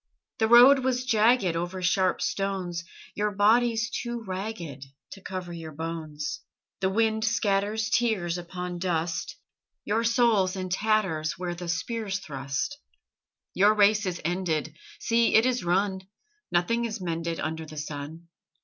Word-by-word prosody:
The 220 - +3
road 245 +4 +8
was 255 -1 -1
jagged 225 -5 +3
Over 175 +2 -3
sharp 185 +1 +2
stones: 185 -3 -2 0.3
Your 210 +1 0
body's 225 +3 +3
too 235 -1 -4
ragged 185 -8 -5 0.3
To 195 - -10
cover 185 -2 -6
your 160 -2 -8
bones. 155 -1 -5 0.4
The 190 - +1
wind 220 +2 +1
scatters 210 -1 +1
Tears 220 -8 +1
upon 180 0 -6
dust; 170 -2 -2 0.5
Your 220 +3 +1
soul's 230 -5 +3
in 185 -1 -4
tatters 190 -6 +1
Where 175 +1 -4
the 175 0 -7
spears 195 +3 -2
thrust. 140 - -4 0.7
Your 205 +3 +4
race 210 0 +4
is 180 -1 -3
ended 165 -3 -1 0.2
See, 230 0 +2
it 220 - +6
is 250 -5 0
run: 190 +2 +1 0.5
Nothing 230 +8 +1
is 225 -1 -4
mended 165 -2 -3
Under 160 0 -4
the 155 0 -10
sun. 150 +3 -6
190 Hz, 140 wpm, -27 LUFS, 170-220 Hz, 0.7 s, road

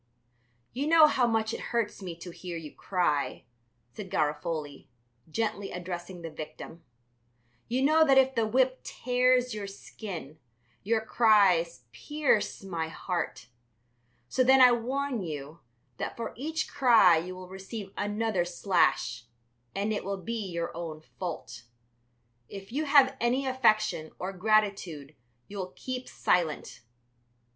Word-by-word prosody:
"You 275 +5 -2
know 320 -1 +8
how 260 -5 +3
much 225 -1 0
it - - -4
hurts 230 -4 -1
me 180 -3 -6
to 175 - -7
hear 175 0 -7
you 155 -3 -9
cry," 175 -7 -1 0.5
said 200 -3 -8
Garofoli, 150 -3 -2 0.4
gently, 210 +1 -2
addressing 175 0 -6
the 165 - -6
victim. 155 +2 -9 0.8
"You 250 +3 0
know 310 +3 +5
that 270 -1 +5
if 265 0 +5
the 230 -3 +1
whip 255 +3 +2
tears 250 0 +1
your 210 -2 -5
skin, 185 -6 -8 0.4
your 220 +2 +1
cries 195 - +3
pierce 275 - 0
my 170 -4 -3
heart. 170 -5 -4 0.8
So 255 - +2
then 265 +1 +6
I 250 -1 +9
warn 255 +1 -1
you 150 -2 -6 0.4
that - - -4
for 235 - -4
each 315 +6 -2
cry 230 - +5
you 180 +3 -4
will 185 0 -9
receive 195 +1 -8
another 205 -2 0
slash, 170 - +1 0.5
and 205 +2 0
it 210 - -3
will 200 +1 -3
be 225 +1 -3
your 170 -1 -4
own 160 -2 -6 0.2
fault. 170 -9 -6 0.8
If 195 +1 -9
you 300 +5 -1
have 280 -2 +5
any 250 +3 +1
affection 215 -10 +2
or 185 +2 -4
gratitude 190 -7 0 0.3
you 205 - -7
will 185 -1 -5
keep 255 -1 -5
silent. 165 -8 0
200 Hz, 135 wpm, -29 LUFS, 170-245 Hz, 0.8 s, I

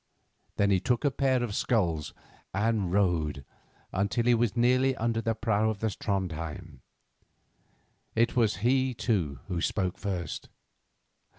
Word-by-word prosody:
Then 100 0 +2
he 95 - +4
took 120 - 0
a 140 - +3
pair 130 -2 +1
of 115 -4 -3
sculls 85 -11 0 0.4
and 105 -3 +1
rowed 85 -8 +1 0.5
until 100 +5 0
he 120 - +5
was 120 -1 +1
nearly 130 +2 +3
under 115 -1 0
the 115 0 0
prow 110 -1 +1
of 110 - -2
the 110 +2 -1
Trondhjem. 85 - -4 1.4
It 115 +1 +2
was 115 -4 +3
he, 130 0 +2
too, 85 - -1
who 85 -2 -2
spoke 95 -1 -1
first. 90 -5 -4
105 Hz, 135 wpm, -29 LUFS, 90-120 Hz, 1.4 s, he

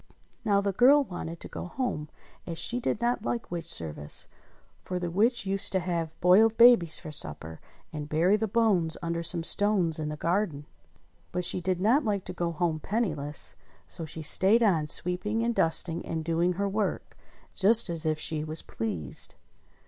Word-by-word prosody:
Now 200 -3 +2
the 200 0 -1
girl 275 +7 +5
wanted 170 -6 -7
to - - -8
go - - -7
home 180 - -4 0.4
as 165 -2 -5
she 240 +7 0
did 235 - -2
not 240 -1 0
like 235 -4 -4
witch 170 -1 -4
service; 75 -2 -3 0.6
for 180 - -4
the 175 -1 -3
witch 225 +5 +1
used 195 0 -2
to 190 - +2
have 170 -3 -4
boiled 210 +5 +5
babies 230 -9 +6
for 155 - -8
supper, 80 - 0 0.3
and 150 -1 -6
bury 170 +6 +3
the 220 +1 -1
bones 195 -7 +1
under 170 0 -2
some 170 0 -1
stones 185 -4 +2
in 155 -1 -3
the 150 - -5
garden. 165 -4 -1 0.7
But 180 0 -2
she 180 - 0
did 180 0 -1
not 235 +10 +3
like 205 -5 -2
to 180 - -6
go 170 -1 -2
home 165 -1 -1
penniless; 155 -8 -2 0.3
so 165 - -7
she 160 +1 -7
stayed 200 +9 +4
on, 165 -8 +2
sweeping, 180 +8 -1
and 235 0 0
dusting, 165 -3 0
and 160 -1 -4
doing 170 +2 +1
her 200 +3 -2
work, 205 +1 -3 0.4
just 215 +4 +5
as 170 -2 +1
if 155 -1 0
she 155 0 0
was 155 +1 -1
pleased. 85 - -5
175 Hz, 180 wpm, -27 LUFS, 160-210 Hz, 0.7 s, babies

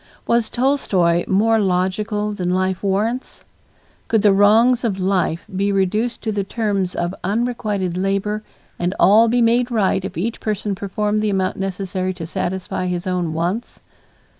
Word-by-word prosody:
Was 235 -1 +1
Tolstoy 195 -10 +1
more 220 +4 +3
logical 205 +3 0
than 180 -3 -2
life 185 0 0
warrants? 210 +6 -2 0.6
Could 220 -2 +2
the 205 -2 +6
wrongs 225 +5 +4
of 200 -5 -1
life 185 -3 0
be 200 +2 +1
reduced 210 +5 0
to 220 - -1
the 205 -1 -1
terms 200 -3 -2
of 175 +1 -2
unrequited 210 -4 -1
labor 195 +3 -1 0.4
and 175 +1 -1
all 220 +4 +6
be 240 +1 +2
made 240 +2 +2
right 200 -5 +1
if 190 - -6
each 220 +7 -2
person 210 -1 -2
performed 210 +2 -1
the 215 - 0
amount 190 -2 0
necessary 190 -1 -3
to 170 -3 -6
satisfy 185 +1 -3
his 180 0 -3
own 180 -3 -1
wants? 175 +8 -3
200 Hz, 155 wpm, -20 LUFS, 185-220 Hz, 0.6 s, the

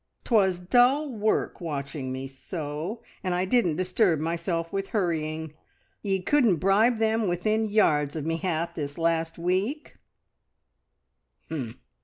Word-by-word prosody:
'Twas 195 -6 +3
dull 245 +10 +3
work 215 -2 0
watching 140 -4 -4
me 130 +1 -4
sew, 150 - -6 0.2
and 185 -2 0
I 180 +1 +1
didn't 190 -6 +2
disturb 185 -1 +2
myself 165 +1 -2
with 195 0 -2
hurrying. 160 -5 -2 0.5
Ye 195 -3 -1
couldn't 245 -6 +4
bribe 200 +8 +3
them 220 -1 +1
within 215 +5 0
yards 150 -9 +2
of 155 -2 -3
me 165 0 0
hat 170 -1 -2
this 145 -2 -5
last 165 0 0
week!" 190 - -2
180 Hz, 125 wpm, -26 LUFS, 160-215 Hz, 0.5 s, couldn't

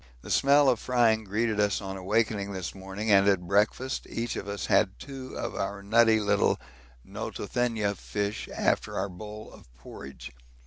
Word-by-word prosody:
The - - -7
smell 140 +1 +5
of 125 -4 +3
frying 115 -3 +2
greeted 110 +2 0
us 105 -1 +2
on 95 -1 -6
awaking 100 +1 0
this 95 -2 -4
morning, 95 +3 -4
and 100 0 +6
at 95 -3 +2
breakfast 105 +7 +1
each 115 0 -3
of 95 - -5
us 100 0 -3
had 95 -2 +2
two 135 -2 -8
of - - -3
our 100 +1 -4
nutty 110 +1 +4
little 105 -1 +2 0.5
Notothenia 115 -5 -2
fish 105 +1 -3
after - - 0
our 100 +1 -1
bowl 105 +4 -9
of - - -17
porridge. 65 +1 -10
105 Hz, 165 wpm, -28 LUFS, 100-115 Hz, 0.5 s, and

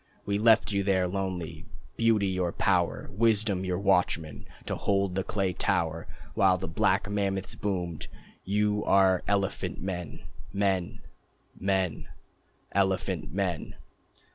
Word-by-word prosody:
We 100 0 0
left 110 0 +5
you 100 -1 +1
there, 95 -2 +2
lonely, 90 -4 -4 0.3
Beauty 115 -3 +3
your 90 -2 0
power, - - +1
Wisdom 105 -2 +2
your 90 -1 -1
watchman, 90 -5 0 0.2
To - - -2
hold 100 -2 0
the 95 +1 -1
clay 95 -2 -1
tower. 80 -1 -1 0.3
While 95 -2 +4
the 95 - -5
black 95 +4 +1
mammoths 100 -2 -1
boomed 90 -5 -3 0.4
"You 105 +1 +1
are 95 -2 +4
elephant 100 -1 -1
men, 90 -4 -5 0.3
Men, 95 -3 -1 0.5
Men, 95 -3 -1 0.7
Elephant 95 -5 0
men." 90 -3 -2
95 Hz, 120 wpm, -28 LUFS, 90-100 Hz, 0.7 s, left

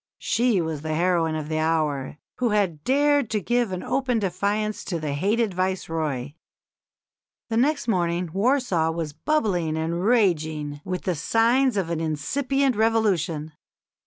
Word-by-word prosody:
She 235 -5 +1
was 160 -3 -3
the 155 0 -2
heroine 170 -2 +1
of 155 -1 -4
the 155 0 -1
hour, 155 -4 0 0.2
who 245 -2 +1
had 190 -8 0
dared 285 -2 +2
to 215 - 0
give 240 +1 0
open 245 +7 -1
defiance 205 +2 -1
to 170 -3 -2
the 150 -2 -3
hated 205 +7 +1
Viceroy. 160 -7 -2 1.2
The 225 - 0
next 285 +1 +1
morning 175 -4 0
Warsaw 200 - +2
was 160 -2 -3
"bubbling 180 - 0
and 165 +2 -2
raging 155 -10 +1
with 180 -1 -4
the 185 - 0
signs 230 - +2
of 175 -4 -1
an 165 - -1
incipient 265 - 0
revolution. 195 -9 +1
185 Hz, 140 wpm, -24 LUFS, 160-230 Hz, 1.2 s, dared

